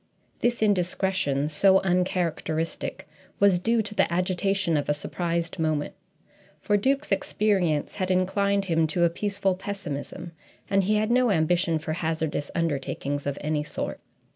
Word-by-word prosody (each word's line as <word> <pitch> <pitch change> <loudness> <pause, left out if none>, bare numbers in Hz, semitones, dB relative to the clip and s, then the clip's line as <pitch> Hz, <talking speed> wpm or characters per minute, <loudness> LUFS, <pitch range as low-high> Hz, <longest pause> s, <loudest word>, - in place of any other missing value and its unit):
This 240 -2 +1
indiscretion, 180 -7 +1
so 190 +5 +4
uncharacteristic, 175 -3 -1 0.3
was 195 -3 +5
due 225 +4 +1
to 210 0 -4
the - - +2
agitation 185 0 +1
of 145 -1 -1
a 150 - +3
surprised 170 +2 -3
moment, 155 -2 0 0.7
for 205 - +1
Duke's 275 +8 +1
experience 200 - +1
had 185 -2 -1
inclined 195 +2 +1
him 165 -3 +2
to 175 +3 0
a 170 - +4
peaceful 200 +1 0
pessimism, 180 -4 -6 0.4
and 195 -1 +2
he 210 +2 +2
had 215 +2 +1
no 250 0 +4
ambition 170 -1 +2
for 155 0 -4
hazardous 160 -3 -2
undertakings 145 -3 -2
of 140 0 -2
any 150 0 0
sort. 150 - -4
180 Hz, 140 wpm, -26 LUFS, 160-200 Hz, 0.7 s, was